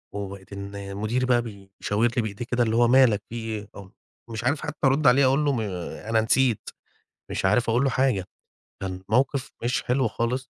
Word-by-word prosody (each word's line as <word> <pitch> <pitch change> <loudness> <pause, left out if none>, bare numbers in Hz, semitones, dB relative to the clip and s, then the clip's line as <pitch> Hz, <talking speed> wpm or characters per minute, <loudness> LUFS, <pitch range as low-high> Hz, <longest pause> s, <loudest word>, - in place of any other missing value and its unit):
وبقيت 100 -1 -7
إن 100 0 -7
مديري 115 +5 0
بقى 120 -1 +3
بيشاور 105 +1 -2
لي - - +4
بإيديه 110 +2 -5
كده 120 0 +1
اللي 110 -1 0
هو 120 0 +5
"ما 130 +2 +7
لك 105 -3 0
في 120 - -7
إيه؟" 110 -3 -5
أو 100 -1 -11 0.4
مش 115 0 -5
عارف 140 +4 +1
حتى - - -5
أرد 140 +2 +3
عليه 130 +3 +6
أقول 135 +3 +3
له 145 - +3
ما 105 -1 -4
أنا 110 -1 +3
نسيت، 120 0 +2 0.6
مش - - -3
عارف 110 +4 +3
أقول 125 +4 +2
له 135 - +2
حاجة. 125 -7 +1 0.6
كان 95 -1 -4
موقِف 130 +3 +1
مش 125 +2 0
حلو 125 0 +1
خالص. 120 +3 -2
115 Hz, 200 wpm, -25 LUFS, 100-125 Hz, 0.6 s, ما